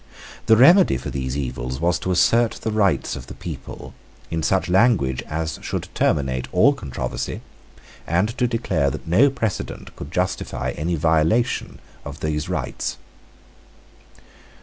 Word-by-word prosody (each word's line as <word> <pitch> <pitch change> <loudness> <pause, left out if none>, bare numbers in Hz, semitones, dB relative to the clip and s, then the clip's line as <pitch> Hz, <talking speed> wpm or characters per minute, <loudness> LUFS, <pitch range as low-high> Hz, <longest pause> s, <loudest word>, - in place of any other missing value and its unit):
The 110 - +6
remedy 175 - +6
for 75 - -6
these 65 0 -3
evils 65 -1 -4
was 85 +2 +1
to - - -4
assert 115 +6 +3
the 110 - -4
rights 105 -3 +1
of 65 - -9
the - - -9
people - - -8 0.4
in 80 -1 -1
such 95 +4 +1
language 90 - +3
as 80 0 -3
should - - -4
terminate 65 -3 0
all 115 +11 +5
controversy, 65 - -5 0.7
and 95 +7 +1
to 125 - +3
declare 95 - 0
that - - -7
no 110 +13 +5
precedent 115 -7 -4
could 70 - -8
justify 90 +1 -2
any 85 +3 -2
violation 80 +8 +1 0.3
of 75 +1 -9
those 75 -1 -2
rights. - - -3
85 Hz, 140 wpm, -22 LUFS, 70-110 Hz, 0.7 s, The